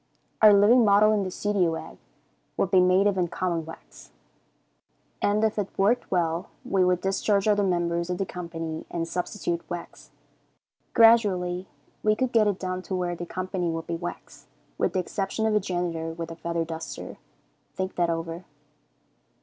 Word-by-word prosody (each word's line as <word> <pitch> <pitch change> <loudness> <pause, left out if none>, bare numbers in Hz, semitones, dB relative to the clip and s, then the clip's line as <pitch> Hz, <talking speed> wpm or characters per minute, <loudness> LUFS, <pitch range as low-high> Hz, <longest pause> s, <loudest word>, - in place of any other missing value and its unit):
Our 215 -1 +9
living 210 +5 +6
model 210 0 +5
in 210 - +1
the 190 - -2
studio 185 -4 0
act - - -9 0.6
would 190 - 0
be 190 - +6
made 185 +2 +4
of 190 -4 +1
common 170 -2 -2
wax, 165 - -12 1.1
and 210 +1 +2
if 220 -1 +1
it 205 - -2
worked 210 +6 +2
well, 170 -2 0 0.2
we 190 -1 +2
would 180 0 +2
discharge 195 +1 +1
other 205 -1 +3
members 175 -2 0
of 180 - -1
the 195 - -1
company 165 -3 -6
and 165 -1 -3
substitute 175 -1 -3
wax. 175 -1 -8 0.9
Gradually 195 -6 +4 0.3
we 215 0 +3
could 255 +1 -1
get 220 -2 +4
it 200 -3 0
down 185 -1 -3
to 185 - -4
where 175 -1 -1
the 175 0 -7
company 185 -1 -3
would 165 0 -3
be 170 - -3
wax, 175 +1 -8 0.3
with - - 0
the 185 - +1
exception 195 +4 -2
of 220 - +2
a 210 - +4
janitor 175 -3 -3
with 165 0 -6
a - - -7
feather 170 0 -2
duster. 160 0 -7 0.6
Think 190 0 -3
that 175 -1 +1
over. 165 +1 -4
185 Hz, 170 wpm, -26 LUFS, 170-205 Hz, 1.1 s, Our